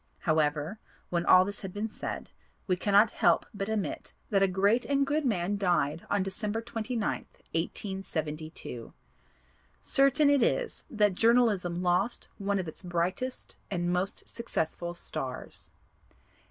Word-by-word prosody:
However, 155 +4 +1 0.3
when 170 -1 0
all 185 0 +8
this 200 +1 -4
has 195 - -5
been 205 +3 -2
said 215 - -6 0.3
we 185 - +2
cannot 205 +4 +4
help - - +3
but 200 0 -3
admit 215 -3 -3 0.2
that 195 -2 +3
a 195 - +5
great 200 +6 +3
and 280 0 +2
good 300 +3 0
man 200 -2 0
died 170 -5 +1
on 205 -2 +2
December 210 +3 -2
29th, 230 -1 -3 0.2
1872. 160 - -4 0.9
Certain 275 +1 +4
it 285 -2 +4
is 475 - 0
that 210 -6 +3
Journalism 205 -6 +3
lost 180 +6 +1
one 200 0 0
of 185 -3 -2
its 160 - -8
brightest 180 +8 -2
and 175 -2 0
most 185 +2 -2
successful 175 -6 -3
stars. 135 -6 -5
195 Hz, 135 wpm, -29 LUFS, 175-225 Hz, 0.9 s, all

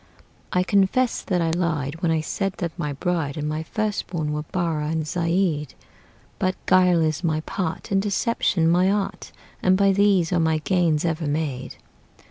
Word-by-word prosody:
I 180 - +2
confess 200 +6 +2
that 180 -3 0
I 165 - +1
lied 165 -3 -2
When 170 -3 +2
I 160 -1 +1
said 195 +4 -2
that 170 -3 -4
my 150 -5 -3
bride 160 -1 -2
And 150 0 -2
my 155 +1 -2
first 215 +5 -2
born 155 -4 -2
were 150 - -2
Barrah 160 -2 -2
and 160 -1 -1
Zeid; 165 -2 0 0.6
But 185 0 0
guile 180 -3 +4
is 155 +2 -1
my 155 -2 0
part, 160 +2 -4
And 195 0 +3
deception 200 -4 +1
my 180 +3 +4
art, 200 0 -2 0.3
And 185 0 +4
by 200 0 +4
these 195 -3 +3
are 175 - +2
my 160 -1 +2
gains 165 -1 +1
ever 160 -1 -1
made. 145 -3 -3
170 Hz, 175 wpm, -23 LUFS, 155-185 Hz, 0.6 s, guile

